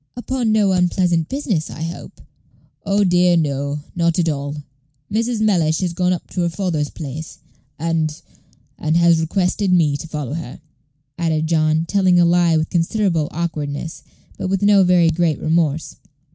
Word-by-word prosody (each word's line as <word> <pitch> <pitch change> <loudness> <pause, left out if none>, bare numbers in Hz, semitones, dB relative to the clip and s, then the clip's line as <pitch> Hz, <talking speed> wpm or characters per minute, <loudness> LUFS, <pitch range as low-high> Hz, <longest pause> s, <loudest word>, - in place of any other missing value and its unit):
"Upon 245 -2 -1
no 210 -3 +3
unpleasant 180 -2 +1
business, 225 - -2
I 155 - -7
hope?" 165 +1 -8 0.7
"Oh, 200 +1 +3
dear, 180 -1 +3
no; 145 -1 -1
not 170 -1 +1
at 170 -2 +1
all. 145 -1 -3 0.6
Mrs. 230 +1 -1
Mellish 170 -7 +2
has 180 -2 -1
gone 180 +1 +1
up 180 - -3
to 180 - -2
her 170 - +1
father's 165 -5 -2
place, 155 +1 -7 0.4
and 160 -1 -1 0.6
and 155 +2 +1
has 170 -1 +4
requested 185 +3 0
me 160 -5 +3
to 155 - -8
follow 150 -4 -5
her," 155 -6 -6 0.6
added 160 -2 0
John, 155 0 +1
telling 185 -1 +3
a 175 - +5
lie 170 -1 +3
with 155 0 -2
considerable 170 -2 0
awkwardness, 155 -2 -4 0.4
but - - -2
with 195 +1 -1
no 205 -1 +5
very 175 -2 +4
great 165 -3 0
remorse. 160 -1 0
170 Hz, 160 wpm, -19 LUFS, 155-185 Hz, 0.7 s, a